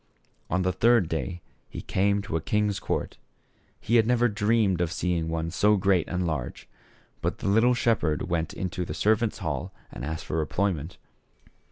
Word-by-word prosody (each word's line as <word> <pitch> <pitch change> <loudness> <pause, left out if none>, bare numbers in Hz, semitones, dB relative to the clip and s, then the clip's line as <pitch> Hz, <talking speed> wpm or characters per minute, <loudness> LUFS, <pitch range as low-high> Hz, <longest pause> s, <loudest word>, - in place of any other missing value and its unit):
On 95 +1 +1
the 90 0 +1
third 115 0 +4
day 85 +2 -4 0.3
he - - -7
came 100 +1 +1
to 90 - -4
a 80 - 0
king's 105 +3 0
court. - - -3 0.6
He 120 - +2
had 110 -1 +4
never 120 0 +3
dreamed 105 -3 +1
of 85 -2 0
seeing 85 -3 -1
one 80 0 -2
so 105 +4 +3
great 95 -2 +2
and 90 0 -1
large. 80 -7 -4 0.5
But - - -1
the - - -4
little 115 +5 +4
shepherd 110 -11 +1
went 85 -2 -1
into 90 -1 -3
the - - -5
servants' 110 +1 +1
hall 70 -5 -3 0.2
and - - -8
asked 80 +3 -4
for 80 - -1
employment. 90 -1 -2
95 Hz, 175 wpm, -26 LUFS, 80-105 Hz, 0.6 s, third